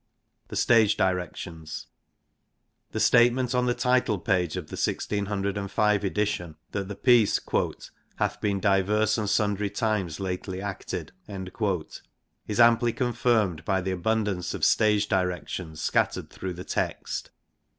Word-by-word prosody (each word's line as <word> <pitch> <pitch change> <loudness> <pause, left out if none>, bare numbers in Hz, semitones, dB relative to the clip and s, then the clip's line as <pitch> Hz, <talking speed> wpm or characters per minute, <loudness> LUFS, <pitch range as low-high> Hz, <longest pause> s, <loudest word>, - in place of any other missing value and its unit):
The - - -8
Stage 115 -3 +4
directions. 90 -3 -3 1.1
The - - -3
statement 125 +1 +4
on 125 0 +1
the 120 - +1
title 125 -4 +2
page 90 -2 0
of 85 -4 -6
the - - -6
1605 100 0 0
edition 100 -5 -1 0.2
that 100 -2 -3
the 100 - -6
piece 120 -1 +4 0.8
'hath 105 0 -2
been 100 -2 0
divers 105 +3 +2
and 105 -2 -1
sundry 105 -1 +1
times 100 -8 -1
lately 95 0 -4
acted 100 -1 -5
' - - -39 1.2
is 105 +2 -2
amply 120 0 +5
confirmed 115 -8 +1
by 95 -2 +1
the 95 0 -2
abund 110 +4 0
ance 90 -3 -2
of - - +1
stage 105 -2 +3
directions 90 -3 -2
scattered - - 0
through 95 -1 -5
the 90 +1 -8
text. - - -3
100 Hz, 130 wpm, -26 LUFS, 95-110 Hz, 1.2 s, amply